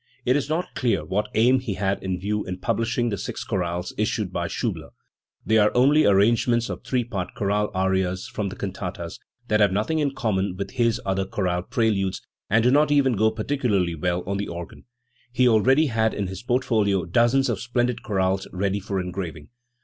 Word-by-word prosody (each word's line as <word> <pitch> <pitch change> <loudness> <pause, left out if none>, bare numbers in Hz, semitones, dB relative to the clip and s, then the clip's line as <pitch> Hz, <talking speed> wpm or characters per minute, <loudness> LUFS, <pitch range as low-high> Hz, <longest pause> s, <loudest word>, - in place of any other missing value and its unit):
It 125 - +3
is 145 -1 -1
not 165 +3 -2
clear 115 - 0
what 105 +6 -1
aim 125 +4 +4
he 120 -6 -4
had 95 +1 -1
in 95 -1 -3
view 105 +2 -1
in 90 0 -4
publishing 115 +5 0
the 100 -4 -3
six - - -5
chorales 90 -1 -2
issued - - -1
by - - -1
Schiibler. - - -3 0.6
They 110 0 +4
are 105 0 +4
only 140 +4 +5
ar 100 - +5
rangements 115 +3 +2
of - - -7
three 125 -2 0
part 100 -6 -5
chorale 105 +1 0
arias 95 -1 0
from 100 -2 -3
the 95 - -8
cantatas, 90 -3 -5 0.3
that 105 -2 +2
have 105 -2 +4
nothing 110 +11 0
in 140 -2 0
common 100 -7 -1
with 100 0 -4
his 115 -2 +1
other 95 0 0
chorale 90 -2 -1
pre 115 +4 +1
ludes, 95 -2 -1 0.3
and 110 +2 +3
do 125 - +4
not 150 +2 +4
even 140 -3 +4
go 110 +1 +3
particularly 110 -6 0
well 90 +2 -1
on 100 +1 -2
the 100 - -3
organ 85 0 -8 0.3
*. 120 - -37
He 125 +1 +4
already 130 +7 +4
had 110 -4 +1
in 100 - -2
his 95 0 -6
portfolio 110 -7 +1
dozens 120 - +3
of 120 -5 -1
splendid 120 0 -1
chorales 95 -3 0
ready 100 +2 -1
for 100 0 -3
engraving. 90 -4 -5
105 Hz, 200 wpm, -24 LUFS, 95-120 Hz, 0.6 s, only